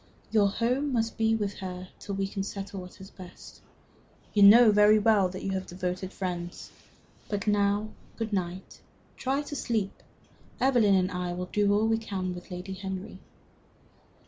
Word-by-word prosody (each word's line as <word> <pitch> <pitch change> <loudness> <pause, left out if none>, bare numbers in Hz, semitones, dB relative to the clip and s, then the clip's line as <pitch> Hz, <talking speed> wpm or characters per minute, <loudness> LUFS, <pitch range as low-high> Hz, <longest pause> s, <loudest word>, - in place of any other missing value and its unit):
Your 210 -2 +4
home 250 +7 0
must 225 -2 0
be 225 0 +2
with 205 -2 -3
her 185 -1 -6
till 200 - -5
we 195 0 -1
can 195 - -7
all - - 0
settle 195 -1 -6
what 180 0 -12
is 190 +1 -11
best. 180 -1 -13 0.7
You 205 - +3
know 215 +3 +9
very 210 +1 +6
well 210 -3 +3
you 195 - -3
have 190 -1 -3
devoted 185 +1 -4
friends. 175 -3 -5 0.6
But 205 -2 -2
now 205 0 +1 0.3
good 225 -2 -3
night. 185 -1 -4 0.3
Try 275 +3 -1
to 290 - -7
sleep. 220 -7 -1 0.7
Evelyn 240 -7 +4
and 185 0 +1
I 180 -1 -3
will 180 +1 -5
do 205 -1 +3
all 210 +2 +3
we 225 0 +2
can 190 -5 -3
with 180 +1 -10
Lady 180 +1 -6
Henry." 190 0 -6
200 Hz, 170 wpm, -28 LUFS, 185-215 Hz, 0.7 s, know